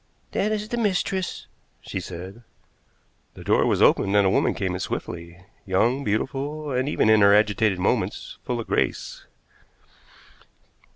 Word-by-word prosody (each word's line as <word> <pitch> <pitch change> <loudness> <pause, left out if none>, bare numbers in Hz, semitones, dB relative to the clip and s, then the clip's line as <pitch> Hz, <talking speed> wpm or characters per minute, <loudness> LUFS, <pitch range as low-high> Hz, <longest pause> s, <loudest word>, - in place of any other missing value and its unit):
"That 210 +2 0
is 210 0 -2
the 240 - -2
mistress," 190 -4 -1 0.3
she 95 - -5
said. 95 +5 -8 0.9
The - - -10
door - - +2
was - - +2
opened, 100 +1 +3
and 100 -1 +5
a 95 - +3
woman - - +2
came 95 -2 -2
in 90 - -4
swiftly, 85 0 -6 0.2
young, 120 +8 +1
beautiful, 140 +7 -2
and, 130 +2 0
even 130 - +1
in 110 -1 +5
her 100 0 +7
agitated 105 -1 +2
movements, 90 - -2
full 120 -1 -3
of 115 - -4
grace. - - -2
110 Hz, 150 wpm, -24 LUFS, 95-145 Hz, 0.9 s, her